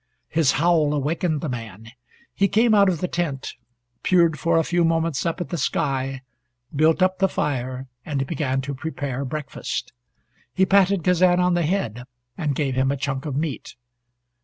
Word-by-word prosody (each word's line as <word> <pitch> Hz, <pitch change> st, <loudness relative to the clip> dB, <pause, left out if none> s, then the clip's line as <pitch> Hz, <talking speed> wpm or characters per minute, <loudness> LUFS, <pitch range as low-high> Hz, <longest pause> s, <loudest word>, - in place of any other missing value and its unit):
His 155 Hz, -4 st, +2 dB
howl 155 Hz, -2 st, +2 dB
awakened 155 Hz, +2 st, -1 dB
the -, -, -3 dB
man. 115 Hz, -4 st, -7 dB, 0.4 s
He 200 Hz, -, +2 dB
came 220 Hz, +3 st, +3 dB
out 200 Hz, -2 st, +5 dB
of 170 Hz, -4 st, -2 dB
the 180 Hz, -, 0 dB
tent, 160 Hz, -7 st, -3 dB, 0.5 s
peered 170 Hz, -4 st, +3 dB
for 165 Hz, +2 st, +2 dB
a 165 Hz, -, +3 dB
few 175 Hz, +1 st, +1 dB
moments 165 Hz, -2 st, +1 dB
up 165 Hz, +2 st, -2 dB
at 175 Hz, -, -4 dB
the 170 Hz, -, -3 dB
sky, 135 Hz, -2 st, -1 dB, 0.5 s
built 160 Hz, +5 st, +3 dB
up 185 Hz, 0 st, +1 dB
the 195 Hz, -1 st, +3 dB
fire, 130 Hz, -3 st, -2 dB, 0.2 s
and 140 Hz, -3 st, -2 dB
began 135 Hz, -3 st, -1 dB
to 140 Hz, +2 st, -5 dB
prepare 140 Hz, -2 st, -4 dB
breakfast. 150 Hz, +2 st, -5 dB, 0.6 s
He 190 Hz, -, +4 dB
patted 195 Hz, -2 st, +3 dB
Kazan 180 Hz, 0 st, +4 dB
on 180 Hz, 0 st, +3 dB
the 175 Hz, -, +2 dB
head, 125 Hz, -, -2 dB, 0.3 s
and 145 Hz, -1 st, -2 dB
gave 140 Hz, -2 st, -1 dB
him 130 Hz, +1 st, +1 dB
a 140 Hz, -, -2 dB
chunk 135 Hz, +1 st, -3 dB
of 140 Hz, -, -3 dB
meat. 150 Hz, -3 st, -4 dB
155 Hz, 175 wpm, -23 LUFS, 135-175 Hz, 0.6 s, out